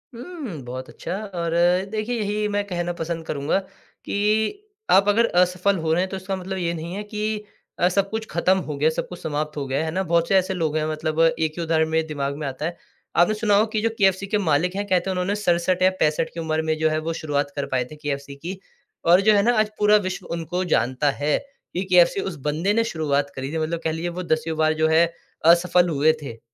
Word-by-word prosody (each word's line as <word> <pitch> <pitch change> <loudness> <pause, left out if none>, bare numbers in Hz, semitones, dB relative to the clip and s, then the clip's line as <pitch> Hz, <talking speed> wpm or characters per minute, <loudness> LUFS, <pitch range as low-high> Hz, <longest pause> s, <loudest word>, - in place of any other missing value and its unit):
हुँ, 245 - -7
बहुत 130 +1 -6
अच्छा - - -5 0.2
और 170 -1 -2 0.4
देखिए, 220 +3 -2
यही 210 0 -1
मैं 205 0 0
कहना 175 -2 -2
पसंद 165 -1 -4
करूँगा 145 +4 0 0.5
कि 215 - 0 0.2
आप 195 +1 +5
अगर 230 +3 +4 0.2
असफल 185 +2 +2
हो 160 -1 -1
रहे 175 - +2
हैं, 190 - -1
तो 190 - -4
इसका 190 +1 -4
मतलब 190 +1 -5
ये 170 -2 -1
नहीं 170 +1 -6
है 205 - -4
कि 210 0 -3 0.4
अ, 175 - +4
सब 195 +1 +1
कुछ 220 +1 -3
खत्म 185 +3 +2
हो 150 - -2
गया, 150 +3 +3
सब 160 - -3
कुछ 180 - -9
समाप्त 150 0 -3
हो 140 - -2
गया 135 +1 -1
है। - - 0
है 160 - -2
ना? 185 +4 -1
बहुत 170 -1 +1
से 195 - +3
ऐसे 190 +1 +1
लोग 160 -4 -1
हैं 155 - 0
मतलब 155 0 -2 0.2
एक 160 -1 +1
ही 170 - -2
उदाहरण 160 -1 +1
मेरे 160 0 +1
दिमाग 140 -2 -3
में 150 - -4
आता 135 +3 -4
है। 170 +1 -3 0.4
आपने 175 +5 +4
सुना 210 -1 +2
होगा 210 +2 +5
कि 215 - +1
जो 230 - +2
केएफसी 195 0 +2
के 210 +1 +1
मालिक 180 0 +1
हैं, 205 +1 -2
कहते 185 0 +1
हैं, - - +1
उन्होंने 185 +2 -1
67 180 -2 +1
या 185 - +7
65 155 +1 +1
की 170 - -6
उम्र 160 -1 -1
में 155 - +1
जो 160 0 +2
है 155 - 0
वो 165 - 0
शुरुआत 145 -2 -1
कर 140 -1 -2
पाए 125 -1 +1
थे - - -8
केएफसी 140 -1 -5
की 180 +6 -7 0.5
और 175 +3 +6
जो 215 - +8
है 200 - +5
ना 240 +3 +3
आज 215 0 +2
पूरा 210 0 +5
विश्व 185 -1 -5
उनको 170 +2 -2
जानता 130 +3 +1
है 150 - +3 0.4
कि 180 - -1
केएफसी 180 +1 +5
उस 190 -4 -4
बंदे 170 +7 0
ने 230 - +3
शुरुआत 145 -8 -1
करी 135 +1 -4
थी। - - -1
मतलब 160 +1 -1
कह 160 - 0
लीजिए 165 +2 -3
वो 185 - -3
दसवीं 160 -1 -1
बार 155 0 +3
जो 160 - +5
है, 160 +2 +5 0.4
असफल 175 +1 +5
हुए 155 0 +3
थे। 115 -6 -8
170 Hz, 245 wpm, -23 LUFS, 155-195 Hz, 0.5 s, जो